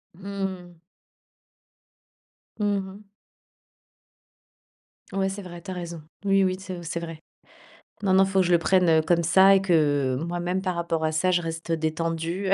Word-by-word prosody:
Mmh. 190 -3 -6 1.8
Mmh 210 - 0 0.2
mh. 195 +2 -11 2.1
Ouais, 195 0 0
c'est 200 +1 -6
vrai, 175 -2 -10
tu 190 - -7
as - - -3
raison. 170 -2 -6 0.2
Oui, 195 0 +4
oui, 185 0 0
c'est 185 -2 -7
c'est 170 +1 -3
vrai. 165 -2 -7 0.8
Non, 190 -1 +2
non, 190 0 +6
il - - -4
faut 195 0 +1
que - - +1
je 175 - 0
le 170 - +5
prenne, 180 0 +3
heu, 160 -1 +5
comme 170 +1 +1
ça 190 +3 +6
et 195 - +3
que, 145 -7 +2
moi 175 0 -3
même 180 +2 -1
par 185 -2 -2
rapport 165 -2 -2
à 155 - +1
ça, 185 +4 +1
je 175 -1 +2
reste, 165 0 -5
heu, 165 - +1
détendue, 165 +4 -2
heu. - - +7
175 Hz, 180 wpm, -25 LUFS, 165-190 Hz, 2.1 s, heu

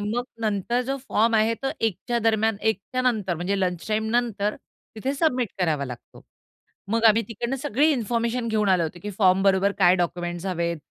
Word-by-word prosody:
मग 220 +4 -2 0.2
नंतर 215 +3 0
जो 270 +1 -1
फॉर्म 225 +2 +2
आहे 220 +1 +3
तो 270 - 0
1 220 -5 +1
च्या 240 -1 +1
दरम्यान 220 -1 +1
1 205 - -4
च्यानंतर 230 -8 0
म्हणजे 180 +4 -2
लंच 180 -2 -2
टाईमनंतर 220 -1 0 0.4
तिथे 265 +6 -2
सबमिट 255 -7 +1
करावा 155 -6 0
लागतो. 125 -2 -10 0.7
मग 230 +1 +1
आम्ही 225 +1 +6
तिकडनं 235 +4 -3
सगळी 290 +2 +2
इन्फॉर्मेशन 235 0 -1
घेऊन 215 -2 +1
आलो 185 -3 +3
होतो, 165 +2 -4
की 210 - -4
फॉर्म 190 -2 +4
बरोबर 195 0 +3
काय 180 -2 +6
डॉक्युमेंट्स 175 0 -3
हवेत, 170 -2 -1
215 Hz, 175 wpm, -24 LUFS, 185-235 Hz, 0.7 s, आम्ही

